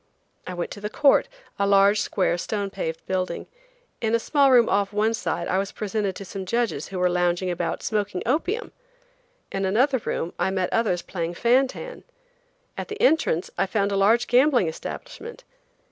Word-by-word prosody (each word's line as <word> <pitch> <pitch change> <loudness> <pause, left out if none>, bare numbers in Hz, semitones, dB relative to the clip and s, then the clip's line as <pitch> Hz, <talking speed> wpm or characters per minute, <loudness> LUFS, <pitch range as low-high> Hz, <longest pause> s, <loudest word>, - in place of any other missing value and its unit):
I 180 - -5
went 175 - -4
to 205 - -8
the 210 - -3
court, 280 - +3 0.3
a 200 - +2
large, 200 +1 +5
square, 185 -3 0
stone 200 +2 -3
paved 165 -4 -4
building. 185 -2 -2 0.6
In 225 0 +1
a - - +2
small 280 +3 +3
room 245 -3 +6
off 200 0 +1
one 215 +2 +1
side 175 -5 -2
I 185 - +1
was 195 0 -3
presented 205 -2 -2
to 195 - -8
some 190 0 -7
judges 235 +1 -1
who 195 - -6
were 180 0 +3
lounging 175 +1 +1
about 175 -1 -3
smoking 205 -4 -2
opium! 360 - -1 0.8
In 195 - -2
still 195 - +1
another 260 +6 +2
room 175 -5 -3
I - - +1
met 190 -1 -1
others 210 -6 +1
playing 170 -1 -4
fan 250 +6 +3
tan! - - -9 0.8
At - - -4
the 425 +1 -7
entrance 320 - +2
I 195 - +2
found 200 0 0
a - - 0
large 220 +5 +4
gambling 250 - +4
establishment! 470 - -7
200 Hz, 185 wpm, -24 LUFS, 185-240 Hz, 0.8 s, room